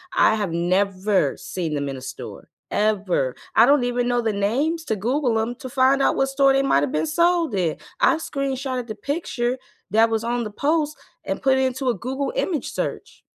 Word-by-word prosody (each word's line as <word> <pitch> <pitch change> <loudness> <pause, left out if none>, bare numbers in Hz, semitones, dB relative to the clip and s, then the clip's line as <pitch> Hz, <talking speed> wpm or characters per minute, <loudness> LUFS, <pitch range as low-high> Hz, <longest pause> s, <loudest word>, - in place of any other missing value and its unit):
I 220 - +5
have 205 -5 -2
never 185 +3 +1
seen 165 -5 -4
'em 140 -1 -2
in 135 - -5
a - - -9
store, 130 - -9 0.2
ever. 200 -11 0 0.2
I 225 - +7
don't 285 -3 +4
even 245 0 0
know 245 -1 +1
the 220 -2 0
names 275 +12 0
to 220 - 0
Google 240 +2 0
'em 235 +2 -2
to 260 -3 -8
find 265 +2 +3
out - - +3
what 270 - +2
store 270 0 +4
they 270 0 +2
might 140 - +3
have 140 - -1
been 155 +1 0
sold 340 - +2
in. 170 -4 0 0.2
I - - +4
screenshotted 270 -4 -3
the 215 - -5
picture 255 -1 -2 0.3
that 225 +1 +4
was 225 0 -1
on 240 0 -1
the 210 - -5
post 300 +4 0 0.3
and - - -3
put 265 -1 +3
it - - +2
into 260 0 0
a - - +2
Google 265 - -3
Image 340 - -1
search. - - -5
245 Hz, 205 wpm, -23 LUFS, 205-275 Hz, 0.3 s, I